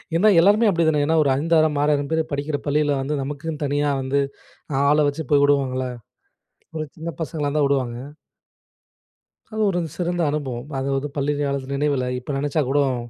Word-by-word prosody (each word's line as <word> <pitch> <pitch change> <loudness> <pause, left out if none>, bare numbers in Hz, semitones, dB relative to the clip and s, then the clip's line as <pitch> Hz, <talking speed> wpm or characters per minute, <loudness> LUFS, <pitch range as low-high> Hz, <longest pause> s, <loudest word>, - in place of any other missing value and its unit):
ஏன்னா, 200 +6 +5
எல்லோருமே 210 +5 +5
அப்டி 170 -4 +2
தானே 150 -2 +2
ஏனா 160 +2 +2
ஒரு 140 - +1
5,000 155 -1 +2
6,000 145 -1 +1
பேர் 160 0 +2
படிக்கிற 145 +1 -2
பள்ளியில 145 0 +2
வந்து 145 +3 -2
நமக்குன்னு 150 +2 -5
தனியா 145 +1 0
வந்து 135 +2 0 0.7
ஆள 150 - +4
வச்சு 155 +2 -5
போய் 145 -1 +5
வுடுவாங்கல்ல, 130 -2 +1 0.9
ஒரு 155 -1 -2
சின்ன 160 +1 -5
பசங்களாருந்தா 150 0 -1
வுடுவாங்க. 130 -4 -1 1.6
அது 220 - -2
ஒரு 175 -2 0 0.2
சிறந்த 175 0 -1
அனுபவம். 135 -4 -4
அதாவது 135 +1 -1
பள்ளி 145 0 0
காலத்து 140 -2 -2
நினைவுல 140 -2 0
இப்ப 125 +3 -6
நெனைச்சா 145 +2 0
கூடும் 135 -2 +2
145 Hz, 155 wpm, -22 LUFS, 140-155 Hz, 1.6 s, ஏன்னா